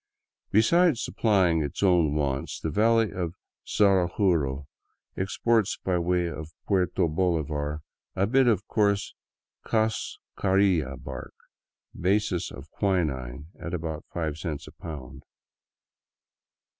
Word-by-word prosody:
Besides 155 - +4
supplying 95 -7 +2
its 75 +6 -3
own 85 -6 +4
wants, 70 -2 -1
the - - -3
valley 115 +1 +3
of 90 -2 -3 0.3
Zaraguro 90 -8 +2 0.5
exports 105 +3 +1
by 90 -2 +1
way 90 +1 +1
of 80 -1 -7
Puerto 90 -3 +1
Bolivar 75 -3 -1 0.3
a 95 - +2
bit 130 +4 +3
of 105 -3 +2
coarse 100 -2 +1 0.5
cascarilla 95 - 0
bark, - - -8 0.6
basis 95 -1 0
of 70 +3 -11
quinine, 75 - -1
at 85 +1 -4
about 80 -2 -4
five 80 -3 -3
cents 80 -4 -4
a - - -11
pound. 75 -7 -9
90 Hz, 105 wpm, -27 LUFS, 75-100 Hz, 0.6 s, Besides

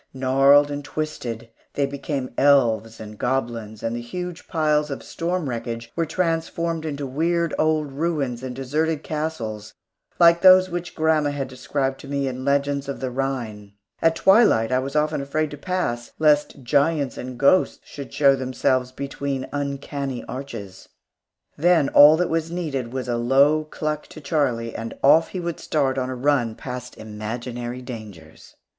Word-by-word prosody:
Gnarled 135 +2 +4
and 145 0 -4
twisted, 120 -7 -5 0.2
they 140 - +2
became 140 -2 -4
elves 115 -6 +3
and 105 -1 -10
goblins, 115 -4 -2
and 115 +1 -1
the 120 - -4
huge 180 +7 -6
piles 150 -3 +1
of 140 - -5
storm 170 -1 -3
wreckage 115 -1 -5
were 165 -1 0
transformed 165 -1 -1
into 145 -2 -4
weird 165 +5 0
old 155 -2 +1
ruins 140 -5 -2
and 130 -1 -6
deserted 150 +4 -1
castles 115 -10 -4 0.4
like 170 0 +6
those 185 -1 +7
which 175 0 -5
grandma 155 -2 +2
had 140 -2 -3
described 135 +1 -3
to - - -11
me 140 -1 -1
in 130 0 -4
legends 140 0 0
of 140 - -4
the 130 -1 -3
Rhine. 120 -6 -4 0.3
At 165 0 +3
twilight 190 - +4
I 130 - +3
was 135 +2 -5
often 150 -1 +1
afraid 150 +2 -2
to - - -6
pass, 145 -10 -3
lest 150 -3 +2
giants 145 +1 +1
and 125 0 -7
ghosts 140 +8 +3
should 140 -2 -9
show 140 -2 +4
themselves 130 -1 0
between 135 0 -4
uncanny 140 -2 -3
arches. 115 -8 -8 0.7
Then 165 -3 +3
all 150 +2 +8
that 180 +1 +1
was 165 0 0
needed 145 -9 -3
was 130 0 -4
a 120 -1 0
low 140 +6 +3
cluck 155 0 -4
to - - -11
Charlie, 135 -6 -1
and 115 0 -6
off 160 +4 +6
he 185 - -5
would 170 -2 -4
start 135 -4 0
on 130 0 -2
a 130 - -4
run 125 -4 +1
past 125 -1 -7
imaginary 120 +3 -6
dangers. 105 -11 -11
140 Hz, 160 wpm, -23 LUFS, 125-155 Hz, 0.7 s, all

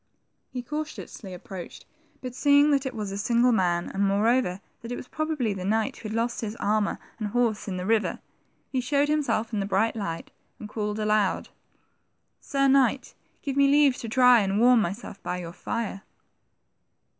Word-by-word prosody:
He 250 -1 -5
cautiously 300 -8 -6
approached, 180 0 -9 0.4
but 255 -2 -6
seeing 285 +2 +4
that 275 -1 +2
it 260 - -6
was 210 -3 -4
a 200 - -4
single 235 +3 +3
man, 175 -5 +1
and 195 - -1
moreover 200 0 +2 0.2
that 230 - -8
it - - -2
was 255 - -8
probably 310 -9 -1
the 190 -2 -6
knight 215 +3 0
who 215 - -7
had 215 - -4
lost 230 +1 -1
his 220 -1 -4
armor 210 -1 0 0.2
and 215 - -2
horse 230 -1 0
in 185 -2 -3
the 180 - -4
river, 220 +1 +1 0.5
he 260 - 0
showed 285 +3 +1
himself 275 -7 0
in 210 - 0
the 195 - -2
bright 205 +4 +1
light, 170 -7 -5 0.3
and 215 - -7
called 210 -1 -3
aloud, 210 -2 +1 0.9
Sir 275 -1 +1
Knight, 265 -1 +3 0.3
give 275 -2 -2
me 280 0 +5
leave 285 -2 +5
to 230 - -6
dry 250 +1 +6
and 200 0 0
warm 245 0 +6
myself 200 +2 -5
by 180 - -3
your 170 -2 -7
fire." 205 0 -4
225 Hz, 180 wpm, -26 LUFS, 200-255 Hz, 0.9 s, dry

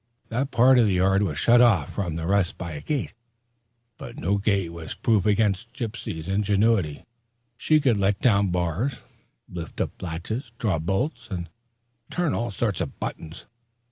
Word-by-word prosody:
That 130 +4 -1
part 125 +2 +5
of 115 - +5
the 95 - +1
yard 95 +2 +3
was 85 -8 -1
shut 120 +6 +5
off 90 -9 +3
from 85 -3 -2
the 80 0 -3
rest 95 -1 +1
by 85 -2 -5
a 75 -2 -6
gate; 145 - -2 0.9
but - - -9
no 100 +4 0
gate 100 -4 0
was 80 -2 -7
proof 110 -4 +2
against 105 +3 +1
Gypsy's 110 - -5
ingenuity. 100 -4 +1 0.5
She 155 +6 +3
could 125 -7 +2
let 100 0 +2
down 100 -5 +3
bars, 90 - -1 0.4
lift 85 -3 -8
up - - -3
latches, 95 +8 -5
draw 100 -9 0
bolts, 115 - -2
and 85 -4 -5 0.6
turn 175 -4 0
all 120 +1 -1
sorts 105 -2 -1
of - - -5
buttons. 80 +2 -6
100 Hz, 165 wpm, -25 LUFS, 85-115 Hz, 0.9 s, part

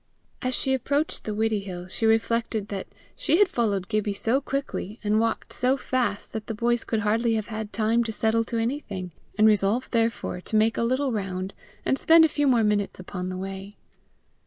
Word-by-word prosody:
As 255 -1 0
she 265 - +1
approached 280 +4 -1
the 215 - -3
Widdiehill, 200 -5 -2
she 225 +4 0
reflected 225 -1 +1
that 195 -2 -4 0.3
she - - +2
had 410 0 +6
followed 205 - 0
Gibbie 210 0 -1
so 240 +7 +2
quickly, 270 -6 -4
and 210 +1 +2
walked 225 0 -1
so 255 +2 +2
fast, 250 -6 -2
that 220 -2 -5
the 225 - -3
boys 240 +2 +1
could 220 -2 -1
hardly 225 +2 +2
have 215 0 -3
had 220 -1 -5
time 225 +3 +2
to 225 - -2
settle 220 +1 +1
to 230 - -3
anything, 225 -7 -3 0.3
and 215 - +5
resolved 215 +3 +3
therefore 225 -5 0
to 215 - -4
make 220 +1 +3
a - - +1
little 260 +3 +1
round 190 -3 -3 0.3
and 270 - +1
spend 325 0 +7
a - - +2
few 290 -1 +1
more 240 -4 +4
minutes 205 -2 0
upon 180 0 -5
the 185 - -4
way. 195 +2 -6
220 Hz, 195 wpm, -26 LUFS, 205-240 Hz, 0.3 s, spend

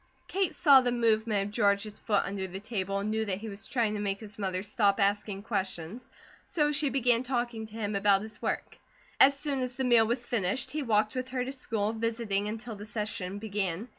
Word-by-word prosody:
Kate 380 -3 0
saw 280 -6 +7
the 245 -1 0
movement 220 -3 +2
of - - -14
George's 205 +1 +1
foot 205 -3 +1
under 195 -1 -3
the 190 +1 -7
table, 195 -2 -3
and 205 +2 -2
knew 220 0 0
that 195 -4 -1
he 220 +2 -7
was 200 +2 -7
trying 230 -6 0
to 210 - -3
make 200 -1 -1
his 210 -1 -11
mother 185 -2 -1
stop 205 0 +2
asking 200 0 0
questions; 195 0 -3 0.3
so 295 -3 +1
she 290 0 +2
began 245 -3 +3
talking 240 -3 -2
to 215 - -17
him 210 -2 -3
about 200 0 +3
his 220 0 -10
work. - - -3 0.4
As 275 +1 +7
soon 285 -2 -1
as 250 -1 -3
the 265 - -2
meal 235 -3 +5
was 240 +1 -1
finished 240 +4 -1
he 305 +2 -2
walked 215 -4 +2
with 255 0 -3
her 255 -1 -2
to 265 - -4
school, 225 -5 -2
visiting 225 -3 -1
until 220 +1 -5
the 205 - -9
session 210 -3 -4
began. 205 0 -2
220 Hz, 215 wpm, -29 LUFS, 200-245 Hz, 0.4 s, saw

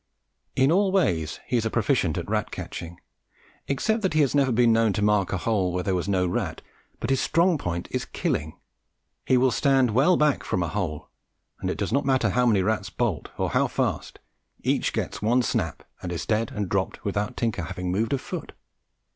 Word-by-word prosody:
In 135 +2 +4
all 195 +2 +3
ways 85 - +1
he 125 - 0
is 115 - 0
a - - -1
proficient 110 - +1
at - - -4
rat - - -1
catching, 85 0 -7 0.7
except 220 - 0
that 190 -6 0
he 155 - +5
has 140 - +2
been 125 -5 +4
known 115 -2 +3
to 105 - -1
mark 105 -2 +2
a 95 - 0
hole 95 -2 0
where 90 +1 -2
there 95 - 0
was 90 +2 -1
no 95 -2 +2
rat; 90 - -2 0.4
but - - -2
his 135 - +2
strong 170 -1 +2
point 85 -3 -3
is - - -2
killing. 80 +1 -2 0.7
He 130 - +4
will 130 0 +3
stand 135 -2 +3
well 140 +11 +4
back 150 -2 +2
from 90 - -1
a 85 - -2
hole, 85 -6 -3 0.5
and - - -2
it - - -2
does - - -2
not 140 +2 +2
matter 130 -6 +2
how 125 +2 +2
many 100 -5 +3
rats 105 -1 -1
bolt, 105 -11 -2
or - - -1
how - - +2
fast, - - -2 0.5
each - - +1
gets - - -3
one 120 +4 +3
snap - - -2 0.2
and 90 - -5
is 85 - -3
dead 110 0 0
and 105 -2 -3
dropped 95 +1 -2
without 105 +1 -2
Tinker 115 -6 -1
having 90 +1 -4
moved 110 +7 0
a - - +2
foot. - - -7
110 Hz, 205 wpm, -25 LUFS, 95-130 Hz, 0.7 s, he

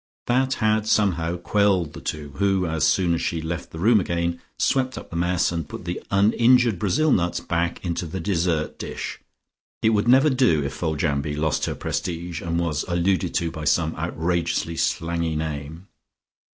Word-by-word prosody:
That 130 +2 +1
had 110 -1 +1
somehow 90 -6 +1
quelled 95 -3 +1
the - - -9
two, 75 -1 -4
who, 95 -1 +2
as 80 -2 0
soon 85 +2 +2
as 85 - -1
she 85 - -1
left 80 +1 -4
the - - -10
room 110 +6 +4
again, 85 -1 -2 0.2
swept 130 -1 +1
up - - -9
the - - -6
mess, 90 +1 +1
and 85 -3 -4
put - - -8
the 90 0 -4
uninjured 115 +2 +4
Brazil 145 - +2
nuts 85 -5 +1
back 85 +2 -2
into 85 0 -2
the 95 +4 -5
dessert 85 -4 -1
dish.... - - -5 0.6
It 110 - +5
would 105 +1 +1
never 135 +5 +6
do 125 - +3
if 70 -1 -3
Foljambe 75 -2 -1
lost 80 0 0
her - - -3
prestige 85 0 -4
and 85 0 -1
was 80 -4 -1
alluded 90 +2 0
to 85 -1 0
by 80 -1 -6
some 80 +2 +1
outrageously 85 0 -1
slangy 85 -1 -1
name. 80 +2 -5
85 Hz, 175 wpm, -23 LUFS, 80-100 Hz, 0.6 s, never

